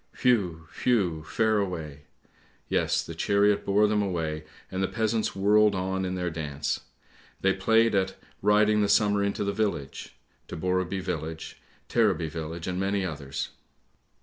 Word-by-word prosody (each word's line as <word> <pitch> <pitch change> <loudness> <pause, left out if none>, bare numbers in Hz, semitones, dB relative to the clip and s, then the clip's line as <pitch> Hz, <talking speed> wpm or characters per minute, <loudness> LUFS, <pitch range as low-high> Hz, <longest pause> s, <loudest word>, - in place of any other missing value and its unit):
"Whew! 90 -10 +2
whew! 90 -11 +1
fare 110 +2 +1
away! 80 -7 -4 0.6
Yes, - - +1
the - - -7
chariot 100 0 +2
bore 100 +2 +3
them 105 0 +2
away, 80 -5 -2 0.3
and 95 - -2
the 95 - +2
peasants 110 +1 -1
whirled 105 +1 +4
on 95 0 -1
in 90 0 -2
their 90 -1 -2
dance. 75 -3 -3 0.6
They 95 0 +3
played 115 +4 +3
at 95 -1 +1 0.2
' - - -33
Riding 105 0 +4
the 100 - +1
Summer 105 -1 +3
into 100 +1 -1
the 100 0 -1
village,' 100 -11 -3 0.3
to - - -6
Borreby 95 +2 -1
village, 80 -1 -5 0.3
Tareby 100 -9 +1
village, 80 +1 -5
and 90 -1 -2
many 100 0 0
others. 70 -5 -4
95 Hz, 150 wpm, -27 LUFS, 80-105 Hz, 0.6 s, whirled